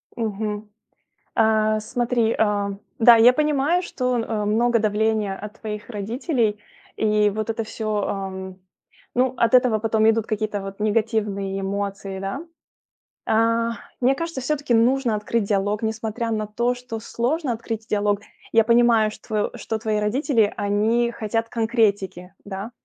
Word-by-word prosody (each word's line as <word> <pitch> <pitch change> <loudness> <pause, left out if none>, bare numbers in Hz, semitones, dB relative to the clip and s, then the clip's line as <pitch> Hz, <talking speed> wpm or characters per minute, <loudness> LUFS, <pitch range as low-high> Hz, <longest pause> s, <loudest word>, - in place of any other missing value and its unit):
Мгм. 210 -1 -3 0.7
А, 215 -1 +3
смотри, 235 +1 0
а, 205 -2 +1 0.3
да, 235 +1 +8
я 235 +2 +7
понимаю, 300 +4 +2
что, 250 -8 -1
э, 220 -2 -2
много 230 +3 +2
давления 215 -1 +1
от 210 +1 -9
твоих 210 -1 -6
родителей 225 - -1 0.4
и 210 -1 +3
вот 215 +2 -4
это 225 0 -1
всё, 215 -1 -2
эм 190 -1 -5 0.6
ну 255 0 +3
от 230 0 +2
этого 250 -4 +5
потом 220 0 +3
идут 225 -1 +1
какие-то 215 -2 -2
вот 195 +1 -8
негативные 210 -3 0
эмоции, 195 0 -3
да. 195 +8 -4 0.9
А, 230 +1 +2 0.3
мне 260 +2 +4
кажется, 330 -1 -4
всё-таки 280 -1 -1
нужно 240 +1 +3
открыть 210 +1 -1
диалог, 205 +1 0
несмотря 225 +1 -2
на 215 -1 -1
то, 235 +4 0
что 245 -2 -7
сложно 250 +6 -1
открыть 225 -1 -5
диалог. 205 -1 +1 0.3
Я 225 -1 +5
понимаю, 235 -2 +4
штво 215 0 -3
что 220 - -3
твои 215 -1 -1
родители, 225 0 +1
они 215 +4 +1
хотят 225 +1 -2
конкретики, 205 -6 0
да, 200 +2 -6
220 Hz, 140 wpm, -23 LUFS, 210-235 Hz, 0.9 s, да